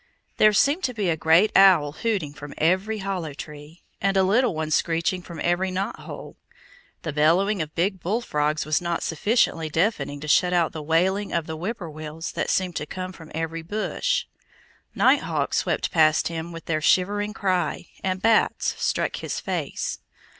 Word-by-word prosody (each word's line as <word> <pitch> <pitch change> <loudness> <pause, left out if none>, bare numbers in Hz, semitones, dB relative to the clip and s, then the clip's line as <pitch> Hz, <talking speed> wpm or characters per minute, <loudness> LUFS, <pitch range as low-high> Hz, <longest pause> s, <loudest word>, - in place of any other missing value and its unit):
There 215 - +6
seemed 280 - +2
to 250 -2 -3
be 205 -5 0
a - - +1
great 160 +6 +4
owl 180 -7 +6
hooting 180 -4 -2
from 145 -1 -10
every 190 +7 +1
hollow 175 -7 -3
tree, 150 +3 -10 0.2
and 195 0 +1
a 190 - +5
little 220 +2 +2
one 155 0 -3
screeching 170 +3 +1
from 170 -2 -10
every 175 +2 +1
knothole. 185 +2 -5 0.7
The 155 - -3
bellowing 175 +6 +3
of 155 0 -6
big 190 +3 0
bullfrogs 155 - -1
was 155 +1 +1
not 170 -1 -2
sufficiently 165 -2 +1
deafening 155 -4 0
to 155 - -6
shut 180 +4 +3
out 170 -2 +2
the 160 - -6
wailing 185 +6 +1
of 165 - -1
whip 175 +9 -4
poor 175 -6 -7
wills 155 +1 -6
that - - -2
seemed 185 -2 0
to 150 - -4
come 185 +2 -6
from 165 -3 -13
every 165 0 -3
bush. 215 - -1 0.7
Nighthawks - - +2
swept - - 0
past 155 -1 +3
him 165 0 -5
with 165 -1 -9
their 155 -2 -1
shivering 205 +5 +2
cry, 185 -4 -1
and 185 0 -2
bats 225 -1 +2
struck - - 0
his - - -4
face. - - -3
175 Hz, 170 wpm, -24 LUFS, 155-195 Hz, 0.7 s, There